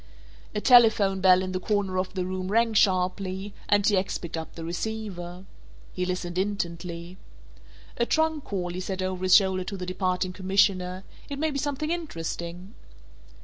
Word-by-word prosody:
A - - +1
telephone 220 -6 +5
bell 185 0 +6
in 185 - -3
the 185 - -2
corner 195 -1 0
of 185 +1 -3
the 185 -1 -1
room 185 0 -3
rang 230 +1 +3
sharply, 190 0 +1 0.2
and 205 -1 +4
T. 210 - +4
X. 190 +1 0
picked 170 -1 -6
up 160 0 -6
the 165 - -6
receiver. 180 -1 -5 0.5
He 180 0 -2
listened 180 -1 -2
intently. 175 -3 -4 0.8
"A 235 - +1
trunk 315 -2 +1
call," 180 -3 -3
he 180 - -4
said 185 0 -3
over 185 -1 -3
his 185 0 +5
shoulder 190 -2 +4
to 195 - -5
the 180 - -5
departing 185 0 -1
commissioner, 185 -1 +1 0.3
"it 280 - -4
may 315 +2 0
be 280 - -2
something 295 +2 -2
interesting." 180 - -5
185 Hz, 170 wpm, -26 LUFS, 180-210 Hz, 0.8 s, bell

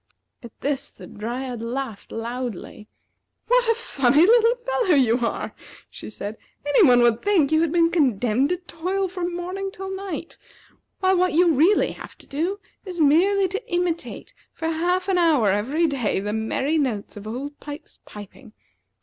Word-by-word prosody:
At 235 -4 -13
this 280 -1 -2
the - - -13
Dryad 240 +2 -5
laughed 235 -2 -5
loudly. 230 -3 -6 0.6
"What - - +3
a 455 - +4
funny 290 - +3
little 465 +2 +5
fellow 480 -8 +2
you 250 -3 +3
are!" 235 -1 -3 0.4
she - - -9
said. 215 0 -7 0.3
"Any 290 +7 +4
one 245 -8 +6
would 235 -1 +3
think 365 -9 +2
you 315 0 +4
had 330 -2 +1
been 335 0 +3
condemned 255 - +2
to 360 - 0
toil 370 +2 -3
from 355 -1 -4
morning 370 +3 -4
till 385 0 -6
night; 380 -4 -6 0.6
while 375 0 +3
what 365 +1 +2
you 340 +1 +4
really 330 +9 +3
have - - -11
to - - -16
do 345 +8 -2 0.2
is 365 -3 -7
merely 370 +7 +4
to 405 +5 -6
imitate 350 -1 -2 0.2
for 325 - -4
half 355 +3 0
an 375 -2 +2
hour 305 - +3
every 260 - +1
day 265 -11 0
the 205 +2 -3
merry 265 +8 0
notes 230 -8 -2
of 205 0 -9
Old 275 +6 -6
Pipes's 290 +1 -10
piping. 210 +3 -12
310 Hz, 165 wpm, -23 LUFS, 245-365 Hz, 0.6 s, one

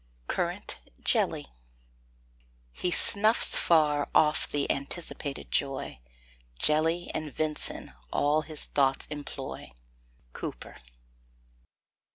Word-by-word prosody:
CURRANT - - -3 0.2
JELLY. - - +1 1.3
He 180 - -2
snuffs 215 +5 +5
far 150 -3 +3
off 150 0 +3
the 145 -1 0
anticipated 140 0 -4
joy, 135 - -2 0.6
Jelly 160 - +2
and 155 -2 -4
ven'son 155 - -2 0.2
all 150 +2 +2
his 155 -1 -4
thoughts 135 -1 +1
employ. 145 - -7 0.6
COWPER. - - -7
150 Hz, 85 wpm, -28 LUFS, 140-160 Hz, 1.3 s, snuffs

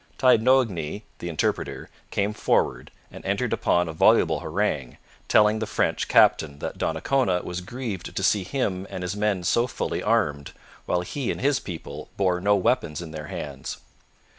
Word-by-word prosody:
Taignoagny, 115 - +3 0.2
the 85 - -5
interpreter, 80 - -2 0.2
came 100 +1 0
forward - - 0 0.2
and - - -11
entered - - -1
upon 90 0 +2
a 80 - -5
voluble 80 - +4
harangue, - - -2 0.3
telling 105 +1 +4
the 110 - -2
French - - 0
captain 70 -3 +4
that - - -6
Donnacona 100 -10 +1
was 90 0 -4
grieved 105 -2 -6
to - - -2
see 100 -3 +3
him 95 -3 -2
and 95 -2 -5
his 90 +2 -3
men 105 -3 0
so 120 +7 +2
fully - - -3
armed, 70 -1 0 0.3
while 90 - +1
he 125 +8 -4
and - - -2
his 140 +1 +2
people 85 -4 -8
bore 90 -2 +1
no 100 +2 +4
weapons 95 - +1
in 85 -2 -7
their 75 -1 -7
hands. 70 -3 -6
95 Hz, 165 wpm, -25 LUFS, 85-110 Hz, 0.3 s, voluble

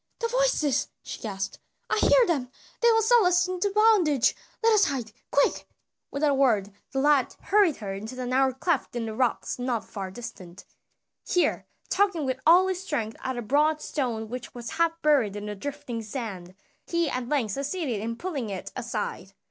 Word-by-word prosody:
"The 465 -1 -2
voices!" - - +1 0.2
she - - -7
gasped. 195 -3 -4 0.3
"I - - +1
hear - - +5
them, 280 - -1 0.3
they 470 -1 +6
will 450 0 +3
sell 470 0 +5
us 355 0 +3
into 370 +2 -1
bondage! 395 - +4 0.3
Let 455 0 +5
us 415 -2 +5
hide, 250 - -3 0.2
quick!" 280 - +1 0.4
Without 290 +1 +1
a - - +2
word 225 -8 +2 0.2
the 270 - -1
lad 285 -2 +3
hurried 395 -6 +3
her 200 -3 -5
into 220 +6 -7
a 250 - -3
narrow 260 +2 +2
cleft 265 +1 -1
in 235 -1 -2
the 220 - -4
rocks 250 +1 -1
not 245 -3 -1
far 195 -2 -6
distant. 185 -4 -10 0.6
Here, 360 - +1 0.2
tugging 390 -7 +1
with 260 0 -2
all 355 +3 +7
his 375 -1 -2
strength 250 - -3
at 260 -1 -2
a 240 - -3
broad 300 +6 +2
stone 240 -8 -3
which 245 +2 -7
was 240 +2 -6
half 330 +1 +1
buried 270 -10 +3
in 205 0 -5
the 210 - -4
drifting 275 +1 -5
sand, 205 -6 -6 0.3
he 340 -1 +1
at 255 -3 -3
length 260 -8 +1
succeeded 275 - -2
in 230 +1 -3
pulling 280 - -4
it 190 -2 -6
aside. 215 -6 -4
270 Hz, 185 wpm, -26 LUFS, 225-340 Hz, 0.6 s, all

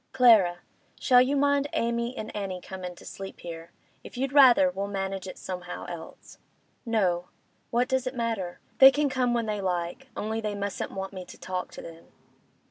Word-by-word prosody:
'Clara—shall 235 +1 +4
you 265 +3 +2
mind 285 0 +2
Amy 235 +2 -1
and 215 - -6
Annie 195 -3 -3
comin' 180 -1 -7
to - - -15
sleep 195 0 -8
here? 165 -1 -8 0.3
If - - -11
you'd 270 +1 -2
rather, 275 0 +7
we'll 200 -6 -3
manage 195 -1 -3
it 185 - -8
somehow 180 -1 -6
else.' 170 -2 -10 0.5
'No. 180 -6 +1 0.4
What 245 +2 +1
does 260 -1 0
it 255 - -4
matter? 225 -7 -3 0.2
They 265 - +11
can 290 +1 +1
come 250 -2 +1
when 235 -1 0
they 210 -2 -2
like, 180 +7 -3
only 220 +1 -2
they 210 -1 -3
mustn't 200 0 -3
want 195 0 -6
me 185 -1 -6
to - - -12
talk 185 -1 -4
to - - -9
them. 165 0 -11
210 Hz, 180 wpm, -27 LUFS, 185-250 Hz, 0.5 s, They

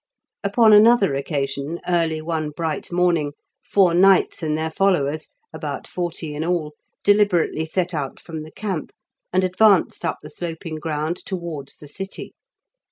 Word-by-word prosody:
Upon 215 +2 +5
another 210 -5 +6
occasion 140 +2 -2
early 165 -3 +1
one 160 -2 -2
bright 160 +2 -4
morning 170 -4 +1 0.3
four 190 -4 +3
knights 190 +2 +4
and 155 -1 -1
their 160 0 -2
followers, 155 -5 +1 0.2
about - - -5
forty 170 -3 -4
in 150 +2 -3
all, 165 -3 -1 0.3
deliberately 200 -6 +3
set 180 +2 -1
out 145 -4 -4
from 160 -2 -7
the 155 +1 -10
camp, 195 -6 -4 0.4
and 185 +1 +2
advanced 190 +1 +3
up - - -1
the 150 - -9
sloping 165 0 -5
ground 155 +1 -2
towards 170 -7 -6
the 150 - -13
city. 195 +6 -7
165 Hz, 145 wpm, -22 LUFS, 155-185 Hz, 0.4 s, another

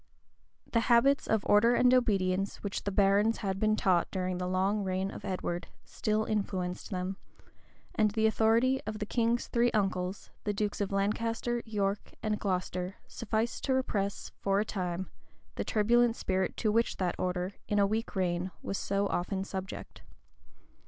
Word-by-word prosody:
The 230 - +3
habits 270 +4 +4
of 220 -2 +1
order 230 +4 +5
and 250 +1 +5
obedience 195 -5 +1
which 200 -1 -3
the 200 - 0
barons 200 +3 +3
had 190 0 -1
been 215 0 +3
taught, 185 -5 +2
during 185 -1 -2
the 180 - -2
long 190 +3 +1
reign 190 +1 -1
of - - -9
Edward, 175 -2 -3 0.2
still 215 -1 -1
influenced 190 -4 -2
them; 185 0 -3 0.8
and 215 -1 +3
the 220 +1 +1
authority 230 +4 +3
of 215 0 -3
the 210 - -3
king's 235 +2 +1
three 240 0 +2
uncles, 190 -2 -1
the 205 - -1
dukes 205 0 -1
of 200 - -1
Lancaster, 230 +4 0
York, 205 -2 -2
and 215 -1 0
Glocester, 185 -1 -2
sufficed 230 +1 -2
to 265 - +2
repress, 200 -6 -1
for 195 0 +1
a 210 - +1
time, 185 -2 -3 0.4
the - - -3
turbulent 235 +2 +3
spirit 190 -3 -1
to 215 - +1
which 230 +2 +1
that 180 -2 0
order, 180 +1 -1
in 205 - 0
a 200 - +5
weak 220 +3 -2
reign, 180 -1 0
was 195 - -3
so 200 0 0
often 190 0 -1
subject. 190 0 -7
200 Hz, 165 wpm, -30 LUFS, 190-220 Hz, 0.8 s, order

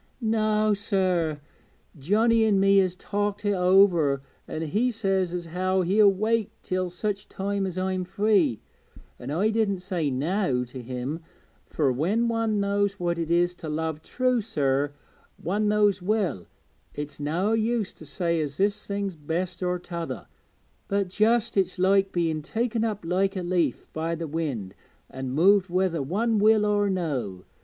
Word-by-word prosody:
'Noä, 215 -2 +2
sir. 185 -6 0 0.6
Johnnie 220 - +3
an' 200 -2 +3
me 195 0 +5
has 185 -2 +3
talked 205 +1 -3
it 205 - +2
over, 180 -7 +4 0.2
an' 160 - -4
he 210 +11 +1
says 195 -6 0
as 175 -1 -4
how 185 +3 0
he'll 200 +3 +5
wait 215 +2 0
till 185 -2 -1
such 200 +3 -4
time 200 0 -2
as 185 -1 -6
I'm 185 0 -1
free. 190 - +1 0.6
An' 125 - -7
I 180 +9 +1
didn't 210 -4 0
say 175 -5 -1
"no" 140 -1 0
to 125 +1 -9
him, 130 +5 -4 0.5
fur 145 -4 +1
when 190 - +1
one 225 -2 0
knows 200 0 0
what 170 -1 -1
it 165 -1 -2
is 175 +1 +2
to 165 -3 -8
love 160 0 -2
true, 255 +5 0
sir, 145 -8 0 0.5
one 205 +6 0
knows 210 -2 +3
well 185 - -1 0.5
it's 145 0 -6
noä 175 +9 0
use 225 -2 0
to - - -14
say 170 +2 -1
as 145 -1 -4
this 205 +1 0
thing's 200 -2 -3
best 170 +4 -3
or 180 0 0
t'other, 170 -1 -6 0.6
but 200 -2 0
just 225 +4 +2
it's 190 -1 +1
like 195 +1 +3
being 165 -4 0
taken 225 +6 -1
up 210 -5 -2
like 190 +3 +1
a 185 - -3
leaf 175 -7 0
by 165 +1 -2
the 165 0 -4
wind 145 -12 -3 0.4
an' 130 0 -5
moved 190 +7 +4
whether 180 -3 0
one 210 - 0
will 215 0 +4
or 205 -1 +2
no. 135 - -3
185 Hz, 160 wpm, -26 LUFS, 160-205 Hz, 0.6 s, me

